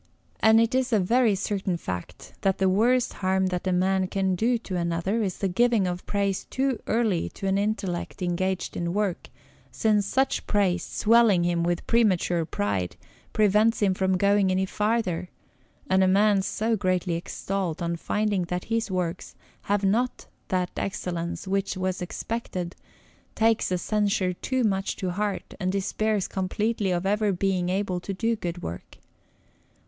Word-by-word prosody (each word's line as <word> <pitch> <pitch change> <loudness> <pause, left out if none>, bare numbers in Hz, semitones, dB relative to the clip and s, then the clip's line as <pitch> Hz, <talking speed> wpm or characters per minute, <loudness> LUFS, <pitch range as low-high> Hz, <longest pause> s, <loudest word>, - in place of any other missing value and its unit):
And 220 0 +6
it 230 +1 +2
is 255 -1 +1
a 220 - +4
very 225 +3 +3
certain 195 -2 -2
fact 90 - -7
that 195 -1 +1
the 195 - +2
worst 235 +6 +2
harm 190 0 +1
that 180 +1 -2
one 180 -1 +2
man 190 0 +2
can 190 0 0
do 235 +7 +2
to 215 -4 -6
another 170 +5 0
is 190 -4 -2
the 195 - 0
giving 225 +2 +2
of 180 0 -4
praise 200 -2 -1
too 265 -3 -1
early 220 -7 +1
to - - -6
any 195 +1 +2
intellect 200 -3 -3
engaged 185 +1 -1
in 170 +1 -2
work, 205 -4 -1 0.4
since 210 -2 +1
such 265 +5 0
praise, 185 -4 +1
swelling 220 -5 +4
him 175 -1 +1
with 175 0 -1
premature 185 -7 +2
pride, 100 - -2 0.4
prevents 215 +2 +3
him 200 -3 +3
from 190 0 +1
going 200 0 +3
any 185 +1 +1
farther, 210 -4 -1 0.6
and 190 0 +3
a - - +4
man 200 +1 +4
so 220 +4 0
greatly 185 -3 0
extolled, 175 0 -3
on 170 -1 -1
finding 205 +1 0
that 180 +1 -3
his 230 -1 0
works 180 -1 -3 0.3
have 205 0 +2
not 230 +6 0 0.2
that 180 -1 -1
excellence 175 -2 -3
which 195 0 -1
was 185 -1 -2
expected, 180 -2 -4 0.6
takes 225 0 +2
the 180 - +1
censure 200 -1 0
too 260 +7 -1
much 195 -3 0
to 185 -2 -3
heart, 205 +2 -3
and 185 -2 0
despairs 200 +1 0
completely 205 +2 -1
of 175 0 -1
ever 210 +1 +2
being 185 -1 0
able 185 -1 -1
to 195 +2 -5
do 230 +3 0
good 175 -4 -5
work. 85 - -7
195 Hz, 165 wpm, -26 LUFS, 180-215 Hz, 0.6 s, And